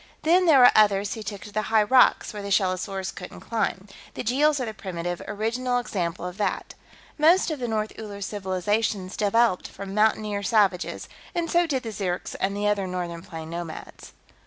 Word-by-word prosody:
"Then, 355 +3 +4
there 310 -4 +7
were 250 -1 +8
others 205 -2 +4
who 220 - -7
took 205 -2 -6
to 210 - -10
the 215 - -1
high 220 -1 +4
rocks, 255 +1 +4
where 210 - -6
the 200 - -6
shellosaurs 190 0 0
couldn't 180 - -9
climb. 215 -4 -2 0.3
The - - -4
Jeels 290 +5 +2
are 255 - -1
the 220 - -5
primitive, 175 -4 -5
original 235 +4 -1
example 180 -7 -3
of 180 +1 -6
that. 210 - -2 0.5
Most 335 +3 +4
of 305 - -4
the 245 - -2
North 215 -1 -2
Uller 205 -2 -7
civilizations 195 0 -2
developed 215 -1 +2
from 195 -1 -8
mountaineer 210 -1 +1
savages, 200 -3 +1 0.3
and 340 -1 -1
so 345 0 +3
did 265 -5 -1
the 225 - -5
Zirks 185 -3 -3
and 200 +1 -1
the 205 0 0
other 200 -2 0
northern 175 -2 -4
plains 165 -2 -8
nomads." 170 -2 -8
210 Hz, 185 wpm, -25 LUFS, 185-230 Hz, 0.5 s, were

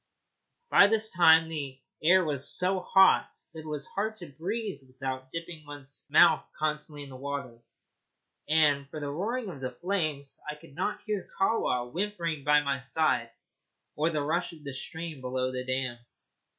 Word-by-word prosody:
By 200 - +8
this 220 +1 +2
time 165 -2 +6
the 140 -5 -5 0.2
air 185 +3 +5
was 140 -2 0
so 185 +1 +2
hot 190 +1 +5 0.2
that 160 - -8
it 155 - -9
was 150 -1 -3
hard 215 +2 -2
to 175 -8 -9
breathe 195 +2 -4
without 130 0 -5
dipping 165 0 -6
one's 145 -1 -9
mouth - - +6
constantly 150 -1 -2
in 140 - -11
the - - -9
water, 135 -3 -5 0.9
and 145 -3 +3
for 155 - -6
the 145 -1 -3
roaring 215 - -2
of 145 -7 -9
the 130 - -2
flames 155 -3 -2
I 150 - -3
could 150 -1 -16
not 210 - -2
hear 210 -3 -3
Kahwa 125 - +1
whimpering 170 -6 -2
at 150 0 +5
my 140 -1 0
side, 130 -4 +1 0.7
or 155 +2 +2
the 150 -3 -1
rush 170 +4 -1
of 155 -2 -14
the 140 -2 -6
stream 160 +1 -6
below 130 0 -1
the 125 0 -3
dam. 130 -2 -2
150 Hz, 170 wpm, -29 LUFS, 140-175 Hz, 0.9 s, By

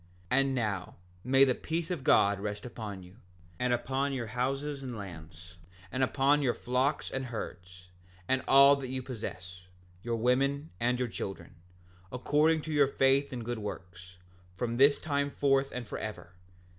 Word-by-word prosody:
7:27 130 - +5
And 135 -1 0
now, 105 -7 -2 0.3
may 135 +2 +5
the 130 -2 +4
peace 165 +6 -3
of 165 -7 -3
God 100 -4 +4
rest 105 +1 -4
upon 105 -6 -7
you, 90 +4 -16 0.4
and 125 0 +1
upon 135 +3 0
your 125 -3 -2
houses 135 +5 -2
and 125 -4 -6
lands, 85 -2 -10 0.3
and 130 - -2
upon 140 +2 +3
your 125 -4 +1
flocks 130 +4 0
and 135 0 -3
herds, 90 -6 -8 0.4
and 130 0 +2
all 140 +1 +8
that 135 -2 -5
you 130 0 -3
possess, 90 -7 -7 0.4
your 115 +2 -2
women 135 +5 +1
and 125 +1 +1
your 125 0 -1
children, 95 -6 -6 0.6
according 150 +5 +2
to 160 - -4
your 145 -2 +5
faith 135 +1 +2
and 120 -3 -5
good 120 -1 -3
works, 90 -3 -8 0.4
from 120 +4 -2
this 140 +2 +6
time 140 -2 -1
forth 135 -1 +1
and 125 -1 -5
forever. 105 -4 -6
125 Hz, 165 wpm, -30 LUFS, 105-135 Hz, 0.6 s, all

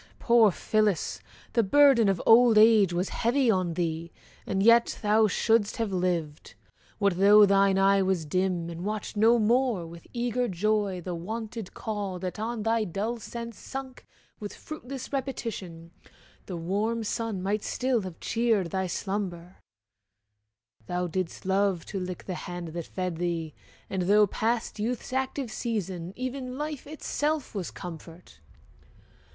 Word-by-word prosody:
poor 235 -3 +5
Phillis! 210 0 0 0.3
The 235 - +4
burden 240 0 +5
of 195 -3 +1
old 230 -1 +7
age 215 -4 +6
was 175 +2 -1
heavy 245 +1 +2
on 185 -4 0
thee, 165 -1 -2 0.4
And 195 0 0
yet 235 +1 +5
thou 215 +1 +4
shouldst 220 +1 +1
have 225 -3 -1
lived! 175 -5 -2 0.4
What 200 -4 +1
though 205 +2 +8
thine 195 -1 +3
eye 195 0 +4
Was 190 -4 0
dim, 180 +1 0
and 170 +1 -7
watched 210 +1 -4
no 225 +3 +5
more 235 -4 +2
with 170 +1 -12
eager 245 0 -1
joy 200 0 0
The 180 +1 -5
wonted 220 +4 -6
call 205 -4 -4
that 180 +1 -5
on 225 0 -3
thy 225 0 +1
dull 215 +5 -3
sense 235 +1 -7
sunk 265 -1 -8 0.3
With 205 -2 -7
fruitless 275 -4 -8
repetition, 210 -11 -5 0.6
the 180 - -5
warm 210 +7 -1
sun 220 -3 -3
Might 205 +2 0
still 255 -2 0
have 185 -4 -8
cheered 225 -7 0
thy 190 -1 -1
slumber; 185 -2 -4 1.3
thou 180 0 -1
didst 180 +1 -4
love 190 -2 +1
To 195 - -4
lick 180 -1 -5
the 185 - -5
hand 175 -1 -6
that 170 0 -6
fed 185 -3 -3
thee, 165 -3 -2 0.3
and 190 - -2
though 205 +3 +5
past 225 +2 -2
Youth's 235 +3 -3
active 265 -2 -2
season, 190 -8 -3
even 255 0 -5
life 300 -2 -5
itself 300 -1 -2
Was 195 -5 -3
comfort. 165 - -10
205 Hz, 145 wpm, -27 LUFS, 180-230 Hz, 1.3 s, though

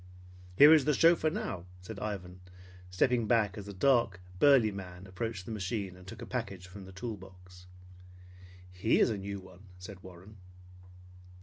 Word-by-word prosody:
"Here 145 +9 +9
is 155 -4 +5
the 150 -1 +2
chauffeur 165 -1 +4
now," 90 - -4
said 100 +3 -9
Ivan, 90 -4 -5 0.5
stepping 115 +5 +1
back 110 -4 +2
as 100 -1 -8
a - - -6
dark, 115 -2 +2 0.2
burly 135 -7 +5
man 90 -2 -9
approached 95 0 -5
the - - -7
machine 100 -2 -3
and 90 +1 -15
took - - -9
a - - -6
package 95 -2 -5
from 95 +1 -11
the 95 - -11
tool 105 +4 -6
box. 90 -1 -15 1.0
"He 90 +5 +1
is - - +4
a 105 - -2
new 100 +1 -5
one," 95 +1 -15
said 90 +1 -10
Warren. 95 +3 -13
100 Hz, 170 wpm, -31 LUFS, 90-115 Hz, 1.0 s, Here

